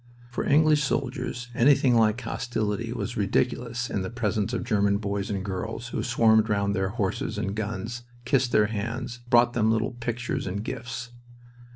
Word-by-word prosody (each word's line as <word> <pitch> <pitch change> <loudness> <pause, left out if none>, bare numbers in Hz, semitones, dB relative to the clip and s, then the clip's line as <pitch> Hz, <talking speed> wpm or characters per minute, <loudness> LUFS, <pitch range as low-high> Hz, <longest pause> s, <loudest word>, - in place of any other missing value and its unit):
For - - -2
English 150 +1 +4
soldiers, 125 -3 -2
anything 130 +1 +4
like 110 0 +3
hostility 115 -2 -2
was 115 -5 -4
ridiculous 120 +3 0
in 100 - -2
the 95 - -3
presence 110 -3 -1
of - - -2
German 100 -1 +2
boys 100 -1 -3
and 100 -2 -2
girls 110 +5 -4
who - - -2
swarmed 110 -2 +4
round 100 -1 +1
their 95 0 0
horses 100 -3 -2
and 100 +1 -2
guns, 110 +2 -4 0.2
kissed 125 -1 +2
their 105 -2 +5
hands, 115 +3 -4
brought 120 0 +5
them 110 -2 +2
little 110 +2 +1
pictures 120 -2 -3
and 100 +3 -3
gifts. 120 +1 -5
115 Hz, 165 wpm, -26 LUFS, 105-120 Hz, 0.2 s, their